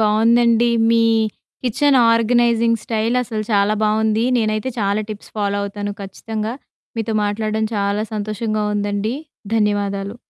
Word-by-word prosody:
బావుందండి 230 +2 +3 0.2
మీ 230 0 +4 0.6
kitchen 275 +3 +3
organising 230 0 +2
style 225 +1 -1
అసలు 220 -3 -4
చాలా 200 +1 +3
బావుంది. 220 +1 +1
నేనైతే 215 +2 -1
చాలా 200 0 +1
టిప్స్ 210 -1 -9
ఫాలో 200 0 0
అవుతాను. 205 0 -4
ఖచ్చితంగా 215 +3 -5 0.4
మీతో 225 -1 -2
మాట్లాడడం 215 +1 -1
చాలా 200 +1 0
సంతోషంగా 215 0 -2
ఉందండి. 205 +3 -1 0.4
ధన్యవాదాలు. 205 0 -1
215 Hz, 115 wpm, -19 LUFS, 205-230 Hz, 0.6 s, మీ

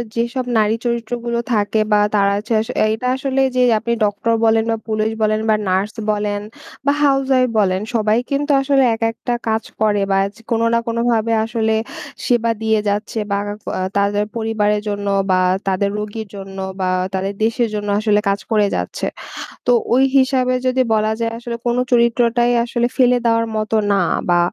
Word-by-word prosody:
যেসব 240 +2 -1
নারী 215 0 +2
চরিত্রগুলো 235 0 -2
থাকে 210 +1 +1
বা 210 - +5 0.2
তারা 200 -1 +3
হচ্ছে 225 +3 -3
স - - -17 0.2
এটা 250 +3 -3
আসলে 270 0 -1
যে 250 - +3 0.2
আপনি 235 +1 -2
ডক্টর 210 +3 0
বলেন 225 0 +3
বা, - - +1
পুলিশ 215 0 0
বলেন 215 0 +1
বা, 215 - +5
নার্স 190 +3 0 0.2
বলেন 205 -1 -2 0.4
বা, 280 - +4
হাউজয়াইফ 270 -2 +3
বলেন, 190 -1 +1
সবাই 215 0 +2
কিন্তু 290 +1 0
আসলে 270 -1 +3
একেকটা 225 +1 -2
কাজ 220 -1 0 0.2
করে 205 -2 +2
বা 195 - +3
এচ 200 - -7 0.2
কোনো 230 0 +2
না 230 - +3
কোনোভাবে 230 -1 0
আসলে 220 -1 0 0.5
সেবা 235 -2 +2
দিয়ে 220 -1 +2
যাচ্ছে 210 +2 -2
বা 200 - +1 0.3
ক - - -38 0.3
তাদের 205 +1 +1
পরিবারের 210 -2 0
জন্য 205 0 -3 0.2
বা 185 - +3 0.3
তাদের 195 +1 +1
রোগীর 215 +1 -5
জন্য 195 0 -9 0.2
বা 185 - 0 0.3
তাদের 195 +1 -2
দেশের 230 0 +1
জন্য 205 0 -3
আসলে 210 -1 +2
কাজ 200 - 0
করে 210 -2 +3
যাচ্ছে। - - -3 0.6
তো 245 - +5 0.2
ওই 260 - +4
হিসাবে 260 -1 +2
যদি 255 0 +2
বলা 215 0 +1
যায় 230 0 -1
আসলে 235 0 -5
কোন 240 - +1 0.2
চরিত্রটাই 240 0 +3
আসলে 240 0 0
ফেলে 250 -1 +4
দেওয়ার 230 0 +2
মতো 215 +1 -1 0.2
না 200 - +3 0.3
বা 175 - +4
225 Hz, 170 wpm, -18 LUFS, 210-240 Hz, 0.6 s, বা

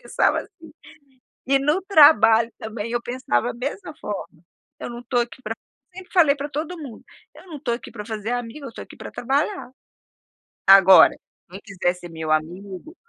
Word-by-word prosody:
Eu - - -29
pensava - - +1
assim. 330 -3 -15 0.8
E 275 +1 +3
no 300 +7 +1
trabalho 285 - +6
também 220 0 -6
eu 240 0 -1
pensava 240 - -1
a - - -13
mesma 290 +7 -6
forma. 190 - -7 0.4
Eu - - -6
não 240 0 -8
estou 245 0 0
aqui 240 +2 -7
pra 225 -2 -5 0.4
sempre 375 -1 -11
falei 320 -6 +5
pra 285 +1 -6
todo 310 +5 -5
mundo: 275 -9 -10 0.3
"Eu - - -16
não 320 -4 -8
estou 260 -4 -2
aqui 235 - -11
pra 210 -2 -8
fazer 220 0 -5
amigo, 245 +4 -5
eu - - -6
estou 230 - -9
aqui - - -15
pra - - -9
trabalhar". 275 - -2 1.0
Agora, 190 -2 +8 0.4
quem 190 +2 -9
quiser 185 -3 -1
ser 180 -1 -11
meu 160 -1 -5
amigo 185 - -3
240 Hz, 185 wpm, -22 LUFS, 200-295 Hz, 1.0 s, Agora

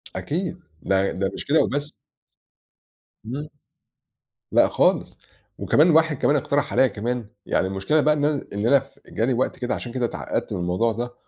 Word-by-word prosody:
أكيد، 175 +3 -3 0.2
ده 95 0 +1
ده 95 +1 -2
مش - - -7
كده 150 +3 +4
وبس. 145 +2 -2 1.3
إمم. 140 +6 -5 1.0
لأ - - +5
خالص، - - +1 0.4
وكمان 160 +4 +4
واحد 160 -2 +3
كمان 145 - +2
اقترح 145 0 0
عليَّ 130 - +4
كمان 120 +2 -3 0.2
يعني 95 - +1
المشكلة 100 +11 +1
بقى 150 +1 +4
إن 145 -1 0
أنا 150 -2 0
إن 100 +2 -1
أنا 135 +1 +3 0.2
جاني 120 +4 0
وقت 125 +2 -1
كده، 125 - -1
عشان 120 - -6
كده 125 -1 -1
اتعقّدت - - -3
من - - -3
الموضوع 90 +7 +1
ده 120 +2 -4
130 Hz, 165 wpm, -23 LUFS, 110-150 Hz, 1.3 s, لأ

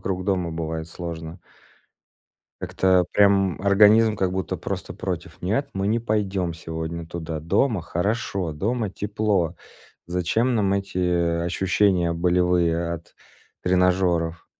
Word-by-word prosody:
вокруг 95 -1 -3
дома 90 -4 0
бывает 80 0 -4
сложно. 85 0 -7 1.2
Как-то 95 -2 +2
прям, 100 -2 +4
м, - - -12
организм 105 +2 +6
как 95 -3 0
будто 95 0 -2
просто - - -5
против: - - -5
"Нет, 110 +10 -1
мы 95 +1 -1
не 115 +2 +2
пойдем 100 -6 -1
сегодня 80 0 -5
туда, 80 -1 -5
дома 95 - +1
хорошо, 95 0 -2
дома 105 +6 -2
тепло. 100 -5 -1 0.5
Зачем 90 +8 0
нам 105 -4 +1
эти, 100 -2 -2
э, 85 -1 +1
ощущения 90 0 +1
болевые 85 -1 +1
от 85 0 -10 0.5
тренажёров?" 90 -2 +1
90 Hz, 125 wpm, -24 LUFS, 85-100 Hz, 1.2 s, организм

